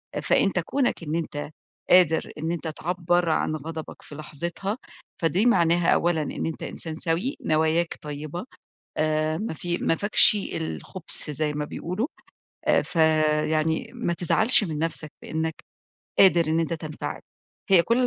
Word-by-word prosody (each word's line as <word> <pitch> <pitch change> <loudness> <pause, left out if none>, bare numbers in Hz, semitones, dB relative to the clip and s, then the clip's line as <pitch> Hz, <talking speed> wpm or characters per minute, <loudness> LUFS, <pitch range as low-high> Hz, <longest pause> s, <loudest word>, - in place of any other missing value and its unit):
آآ، - - -1
فأنت 190 -2 +2
كونك 245 +1 -1
إن 155 0 -3
أنت 150 -3 -4 0.4
قادر 175 -3 +4
إن 160 +2 -2
أنت 170 -1 -4
تعبَّر 175 +1 0
عن 155 0 0
غضبك 160 +1 -7
في 145 - -12
لحظتها، 170 - -3 0.4
فدي 175 +6 +2
معناها 170 -6 +4
أولًا 170 -2 +1
إن 150 - -4
أنت 165 - -5
إنسان 160 -2 -4
سَوِي، 170 - -1
نواياك 160 +2 +1
طيّبة، 150 +5 -6 0.5
آآ 155 0 0
ما 215 -4 -4
في 175 +3 -2
ما - - +1
فيكش 205 +3 +6 0.2
الخُبث 165 0 0
زي 150 0 -1
ما 150 0 -3
بيقولوا. 180 - -3 0.6
آآ، - - +4
ف - - -12 0.6
يعني 160 +5 0
ما 235 -8 -2
تزعلش 215 +8 +4
من 155 -6 -4
نَفْسك 160 -2 -3
بإنّك 160 0 -3 0.6
قادر 175 -4 +6
إن 160 +1 +2
أنت 165 +1 -2
تنفعل. 155 -1 -6 0.5
هي 185 -3 +7
كل 245 +6 +2
165 Hz, 150 wpm, -25 LUFS, 155-180 Hz, 0.6 s, هي